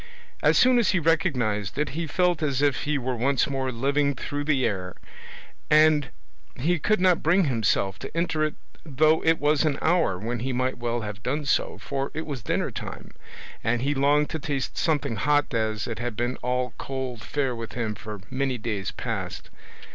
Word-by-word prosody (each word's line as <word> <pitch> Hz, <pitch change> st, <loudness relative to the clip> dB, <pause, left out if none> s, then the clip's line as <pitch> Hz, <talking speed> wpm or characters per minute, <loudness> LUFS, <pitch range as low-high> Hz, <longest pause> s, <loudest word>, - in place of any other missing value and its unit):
As -, -, +4 dB
soon 250 Hz, -1 st, +6 dB
as 210 Hz, -4 st, +2 dB
he 185 Hz, -, +3 dB
recognised 130 Hz, -, +1 dB
it 150 Hz, -, 0 dB
he 165 Hz, +1 st, -3 dB
felt 175 Hz, +2 st, +1 dB
as 140 Hz, -2 st, 0 dB
if 145 Hz, -2 st, +1 dB
he 150 Hz, 0 st, +1 dB
were 130 Hz, -1 st, -2 dB
once 130 Hz, +4 st, +2 dB
more 135 Hz, -2 st, -2 dB
living 140 Hz, +3 st, +1 dB
through 145 Hz, +3 st, -4 dB
the 140 Hz, -4 st, +2 dB
air, 90 Hz, -3 st, -2 dB, 0.7 s
and 155 Hz, -3 st, +5 dB, 0.5 s
he 165 Hz, +7 st, +1 dB
could 215 Hz, +6 st, +2 dB
not 180 Hz, -2 st, +4 dB
bring 180 Hz, +5 st, +4 dB
himself 110 Hz, -, +1 dB
to 135 Hz, +4 st, -7 dB
enter 165 Hz, -2 st, +1 dB
it 155 Hz, -1 st, -1 dB, 0.3 s
though 155 Hz, +1 st, +3 dB
it 165 Hz, 0 st, +4 dB
was 150 Hz, +1 st, +2 dB
an 150 Hz, -3 st, +1 dB
hour 160 Hz, -, +2 dB
when 115 Hz, +5 st, -3 dB
he 130 Hz, +3 st, -2 dB
might 130 Hz, 0 st, -1 dB
well 120 Hz, 0 st, -1 dB
have 105 Hz, -1 st, -6 dB
done 145 Hz, +5 st, -2 dB
so, 135 Hz, -, +1 dB
for 135 Hz, 0 st, -3 dB
it 160 Hz, -, -3 dB
was 140 Hz, -6 st, -5 dB
dinner -, -, -1 dB
time, -, -, -7 dB, 0.5 s
and 115 Hz, +2 st, +1 dB
he 145 Hz, +2 st, +1 dB
longed 145 Hz, +2 st, +2 dB
to 160 Hz, -, -3 dB
taste 140 Hz, -2 st, -3 dB
something 145 Hz, -7 st, 0 dB
hot 145 Hz, +3 st, +2 dB
as 110 Hz, -2 st, -1 dB
it 115 Hz, -2 st, -4 dB
had 120 Hz, -2 st, -3 dB
been 120 Hz, +3 st, -1 dB
all 125 Hz, -1 st, -1 dB
cold 130 Hz, -4 st, -4 dB
fare 135 Hz, -4 st, -1 dB
with 115 Hz, -1 st, -7 dB
him 115 Hz, -3 st, -2 dB
for 105 Hz, -1 st, -8 dB
many 130 Hz, -1 st, -1 dB
days 105 Hz, -4 st, -3 dB
past. -, -, -5 dB
135 Hz, 195 wpm, -26 LUFS, 120-155 Hz, 0.7 s, soon